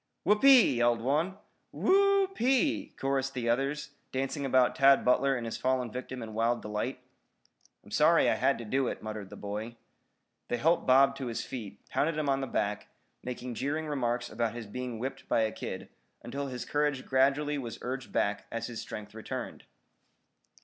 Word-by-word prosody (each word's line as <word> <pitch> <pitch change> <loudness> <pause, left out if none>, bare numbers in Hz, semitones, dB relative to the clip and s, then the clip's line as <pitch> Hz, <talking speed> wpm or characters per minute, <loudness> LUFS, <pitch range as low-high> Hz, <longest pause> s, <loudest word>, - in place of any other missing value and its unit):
"Whoopee!" 215 - +6
yelled 120 0 +3
one. 155 +10 0 0.3
"Who - - +1
o 395 0 +5
o - - 0
p 240 - -3
e 270 +3 +4
e!" - - -23
chorused 135 0 -1
the 120 -2 -2
others, 140 +5 0 0.2
dancing 135 +2 -2
about 130 -1 +3
Tad 135 0 +5
Butler 135 +2 +3
and 120 - -5
his 115 - -4
fallen 130 -2 0
victim 125 0 -6
in 110 -1 -8
wild 115 +2 0
delight. 105 +5 -3 0.8
"I'm - - -16
sorry - - +4
I - - +4
had - - +2
to 115 - -7
do 130 +4 0
it," - - -4
muttered 105 -3 -6
the 105 - -9
boy. 105 +3 -5 0.7
They 120 - -1
helped 165 +7 +2
Bob 135 +2 +6
to 135 -2 -4
his 115 - -3
feet, 105 -6 -8
pounded 155 +1 0
him 150 -2 0
on 135 0 +1
the 135 - -3
back, 105 -3 -2 0.3
making 125 0 -5
jeering 145 +6 -2
remarks 120 -5 -1
about 115 0 -2
his 120 -2 -6
being 125 +2 -5
whipped 130 +4 -6
by - - +3
a 110 -1 +1
kid, - - -6 0.4
until 140 +4 -4
his 125 -2 -5
courage 145 -3 0
gradually 140 +2 +2
was 120 -4 -6
urged 130 +1 -4
back 105 0 0
as 115 0 -3
his 115 -1 -6
strength 105 -1 -8
returned. 110 0 -6
130 Hz, 190 wpm, -30 LUFS, 115-140 Hz, 0.8 s, Whoopee